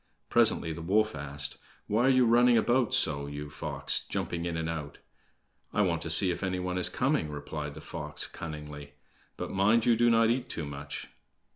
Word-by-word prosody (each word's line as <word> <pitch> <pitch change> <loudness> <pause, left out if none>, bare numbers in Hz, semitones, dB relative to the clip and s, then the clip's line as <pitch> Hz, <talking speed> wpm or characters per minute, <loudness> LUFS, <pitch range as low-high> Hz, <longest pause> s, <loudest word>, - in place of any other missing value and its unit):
Presently 80 - +2
the 85 - -7
wolf 105 +6 +2
asked: 70 0 -2 0.3
"Why 115 +5 +2
are - - +5
you 130 -2 +5
running 120 +1 +5
about 120 +1 +2
so, 70 -2 +2
you 75 0 -7
fox, - - -2
jumping 85 -1 -3
in 85 -1 -2
and 80 0 -2
out?" 75 -3 -5 0.8
"I 105 - +3
want 85 -4 0
to 85 - -4
see 90 +3 +5
if 85 - -4
any 95 -2 -1
one 90 0 -2
is 90 - +2
coming," 75 - 0
replied 75 0 -6
the - - -9
fox 75 0 -5
cunningly; 75 -2 -8 0.4
"but - - -5
mind 105 +4 +3
you 120 - +5
do 120 +1 +4
not 115 0 +4
eat 125 +1 -2
too 80 - -4
much!" 70 0 -7
85 Hz, 190 wpm, -29 LUFS, 75-110 Hz, 0.8 s, are